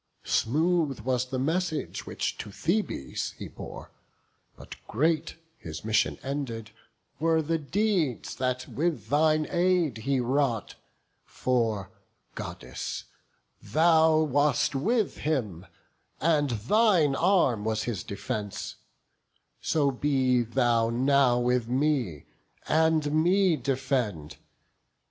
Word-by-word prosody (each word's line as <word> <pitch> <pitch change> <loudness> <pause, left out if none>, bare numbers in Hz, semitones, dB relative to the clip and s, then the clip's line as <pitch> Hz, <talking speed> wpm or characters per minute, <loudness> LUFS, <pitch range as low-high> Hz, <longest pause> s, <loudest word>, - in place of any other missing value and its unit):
Smooth 155 +1 +1
was 125 +1 0
the 130 - -3
message 160 +4 -2
which - - -2
to 105 - -6
Thebes 170 - -2
he - - -8
bore; - - -10 0.6
But - - -11
great, 155 +6 0 0.2
his 80 +3 -8
mission 110 0 +1
ended, 130 -5 -4 0.5
were 160 +1 +2
the 165 +2 0
deeds 170 - 0
That 130 0 -1
with 165 +1 -2
thine 155 +1 +3
aid 175 -8 +2
he 135 +4 0
wrought; 125 - 0 0.5
for, 115 -6 -1 0.4
Goddess, 60 +1 -6 0.6
thou 160 0 +4
Wast 145 0 +2
with 215 - 0
him, 110 - -2 0.5
and 150 -3 +2
thine 155 - +3
arm 165 - +2
was 110 0 -1
his 110 -8 -3
defence: 105 0 -5 0.8
So 145 -3 +1
be 130 -2 +2
thou 120 -1 +1
now 130 +1 +3
with 125 -1 +1
me, 130 - 0 0.4
and 160 -2 +2
me 185 0 +3
defend. 125 - -2
135 Hz, 105 wpm, -27 LUFS, 120-160 Hz, 0.8 s, thou